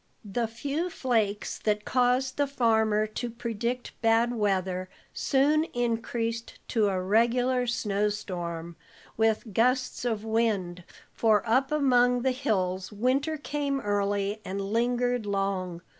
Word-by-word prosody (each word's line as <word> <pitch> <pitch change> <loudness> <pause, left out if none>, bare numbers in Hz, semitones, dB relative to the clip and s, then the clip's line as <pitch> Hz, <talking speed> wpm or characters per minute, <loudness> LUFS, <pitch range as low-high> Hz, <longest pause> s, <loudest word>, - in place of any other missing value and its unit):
The 225 +3 -1
few 285 +9 -3
flakes 220 - -1
that 210 -1 0
caused 255 +1 +1
the 285 0 +2
farmer 220 -5 +2
to 215 +3 -4
predict 235 +1 -3
bad 230 +1 +3
weather 190 -4 -1 0.2
soon 295 +3 +2
increased 230 -1 -2
to 220 -4 +2
a 190 -2 0
regular 240 +6 +2
snow 210 -3 0
storm, 170 -5 -5 0.4
with 220 -1 +1
gusts 250 +4 +1
of 225 -3 -2
wind, 210 -6 0 0.3
for 220 -1 +2
up 260 +5 +2
among 250 -4 +3
the 265 - +3
hills 190 -8 -1
winter 265 +9 0
came 285 -1 -2
early 205 -1 -1
and 195 -1 -4
lingered 240 +3 0
long. 190 -3 -2
225 Hz, 125 wpm, -28 LUFS, 205-250 Hz, 0.4 s, bad